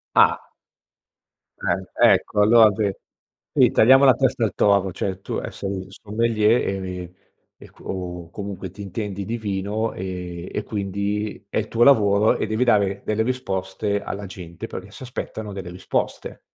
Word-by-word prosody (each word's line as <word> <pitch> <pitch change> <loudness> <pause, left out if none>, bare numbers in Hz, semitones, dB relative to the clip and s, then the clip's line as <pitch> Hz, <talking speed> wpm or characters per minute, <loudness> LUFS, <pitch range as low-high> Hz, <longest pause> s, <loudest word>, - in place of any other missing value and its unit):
Ah. - - +4 1.1
Ah, - - 0 0.4
ecco, 105 - -1
allora 110 0 +7
sì, 105 -1 0 0.7
sì - - +6
tagliamo 135 +4 +6
la 130 - +8
testa 130 -1 +1
al 105 -4 0
toro, 100 -2 +3
cioè, 95 +2 -4
tu, - - -4
ehm, - - -4
sei 100 - -5
un 95 -1 -4
sommelier 110 +2 +1 0.2
e 90 -1 -6 0.4
e - - -15
co - - -19
o 90 -2 -5
comunque 95 -1 -6
ti 100 +2 -11
intendi 100 0 -4
di 115 +3 -3
vino 105 +1 -2
e 90 -2 -6
e 105 - -2
quindi 100 +1 -3
è - - -2
il 110 - -3
tuo 115 +1 +3
lavoro 105 -5 +5
e - - -1
devi 110 +3 +1
dare 100 -5 +2
delle 110 +1 +1
risposte 100 -4 -2
alla 100 +1 -5
gente, 90 +1 -8
perché 95 -1 -8
si 100 - -12
aspettano 110 -4 -6
delle 95 -2 -6
risposte. 90 +1 -3
100 Hz, 165 wpm, -23 LUFS, 95-110 Hz, 1.1 s, la